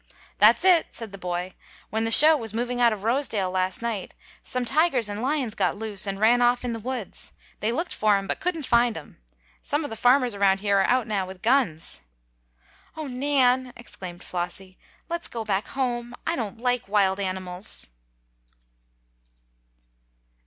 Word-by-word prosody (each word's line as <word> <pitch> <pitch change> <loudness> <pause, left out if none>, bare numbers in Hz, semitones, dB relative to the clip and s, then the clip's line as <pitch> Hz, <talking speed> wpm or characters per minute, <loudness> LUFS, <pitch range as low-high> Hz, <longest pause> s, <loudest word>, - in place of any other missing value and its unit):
"That's - - +5
it!" 355 -3 +6
said 225 -3 -8
the 195 - -10
boy. 180 0 -4 0.4
"When 220 +1 0
the - - 0
show 310 +7 +9
was 225 -6 -5
moving 245 +1 -2
out 235 -1 +5
of 205 -2 -5
Rosedale 225 -6 0
last 185 +3 -1
night, 225 -5 -4 0.3
some 250 -1 -3
tigers 270 -3 +3
and 205 +1 -5
lions 265 -4 -1
got - - 0
loose, 210 -2 -1
and 195 0 -3
ran 235 +3 +4
off 245 +1 +2
in 240 - -2
the 230 - -5
woods. 245 -3 -5 0.3
They 215 - 0
looked 335 +8 -2
for 210 -2 +3
'em, 195 - -4
but - - -2
couldn't 330 -4 -2
find 235 -3 +2
'em. 150 - -12 0.4
Some 295 +2 -2
of 290 - -6
the - - -4
farmers 250 +1 +3
around 195 -1 +2
here 200 -1 +2
are 195 - +3
out 250 -1 +2
now 200 -4 -2
with 185 0 -11
guns." 220 - 0 1.0
"Oh, 310 - -4
Nan!" 255 -1 +1
exclaimed 180 -7 -9
Flossie. 185 +1 -5 0.3
"Let's 340 0 -4
go 230 -2 -6
back 200 -1 -1
home! 245 -3 -3
I 330 - 0
don't 220 -6 -4
like 245 -1 -1
wild 195 -2 +2
animals!" 185 0 -3
225 Hz, 175 wpm, -25 LUFS, 195-250 Hz, 1.0 s, show